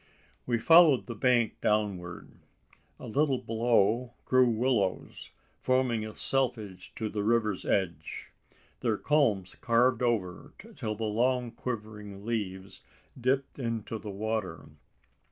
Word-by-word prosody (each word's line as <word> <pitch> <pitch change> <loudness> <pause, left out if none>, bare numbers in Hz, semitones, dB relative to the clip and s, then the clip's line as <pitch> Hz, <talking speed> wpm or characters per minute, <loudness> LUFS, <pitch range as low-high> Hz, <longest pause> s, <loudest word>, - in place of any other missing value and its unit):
We 120 -1 +2
followed 160 +2 +6
the 120 - -6
bank 120 0 +1
downward. 100 -5 -1 0.7
A - - -9
little 140 +2 +1
below 115 +1 +1
grew 130 -1 +4
willows, 115 -4 -1 0.3
forming 130 -3 +1
a 110 - -10
selvedge 115 -8 -2
to 110 - -3
the 105 -1 -3
river's 110 -2 +1
edge. 85 -5 -2 0.5
Their - - 0
culms 115 -12 +1
curved 120 +1 +3
over, 105 -8 -1 0.2
till 110 0 -3
the 110 - -5
long 120 +3 0
quivering 105 -4 -6
leaves 100 -4 -4 0.3
dipped 130 +2 -1
into 115 -2 -3
the 105 - -8
water. 100 -6 -4
115 Hz, 120 wpm, -29 LUFS, 105-125 Hz, 0.7 s, followed